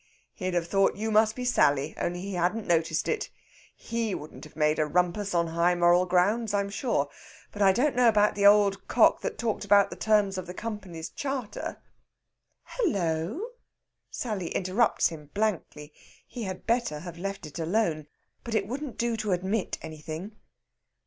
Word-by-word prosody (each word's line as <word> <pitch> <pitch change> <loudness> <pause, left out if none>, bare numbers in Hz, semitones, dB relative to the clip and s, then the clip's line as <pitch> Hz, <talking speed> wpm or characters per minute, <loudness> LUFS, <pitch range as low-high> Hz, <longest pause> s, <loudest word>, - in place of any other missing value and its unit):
"He'd 185 -3 -3
have 170 -1 +1
thought 195 +2 +2
you 220 +2 -2
must 215 0 +4
be 250 - -4
Sally, 150 - +2
only 175 +1 -2
he 200 +1 -5
hadn't 180 +5 0
noticed 165 -1 +1
it. 440 -2 -1 0.5
He 230 -3 -3
wouldn't 150 - -9
have 150 - -15
made 155 0 +2
a 155 - +2
rumpus 180 +4 0
on 170 -1 +2
high 170 +2 +2
moral 175 +1 +4
grounds, 205 +5 +2
I'm 200 0 -1
sure. 205 - 0 0.4
But 205 - -7
I 195 -1 +6
don't 255 +7 +1
know 250 -1 +5
about 210 -1 +3
the 200 0 +4
old 200 -1 +4
cock - - +4
that - - -4
talked 225 -3 -2
about 200 0 +4
the - - -5
terms 205 -3 +2
of 180 - -7
the 180 - -7
Company's 190 -8 -6
charter...." 270 -6 -5 0.8
"Hullo!" 200 - -1 0.6
Sally 210 -8 -3
interrupts 195 +5 +2
him 150 -3 -10
blankly. 170 -8 -2 0.3
He 240 -4 -6
had 185 -1 -6
better 230 -11 0
have 170 0 -9
let 195 +1 -4
it 150 +2 -8
alone. 165 -3 0 0.4
But 230 -1 -4
it 200 -2 +1
wouldn't 260 +2 -5
do 235 0 0
to 215 -3 -1
admit 190 +3 -1
anything. 160 +4 -7
195 Hz, 170 wpm, -27 LUFS, 170-220 Hz, 0.8 s, I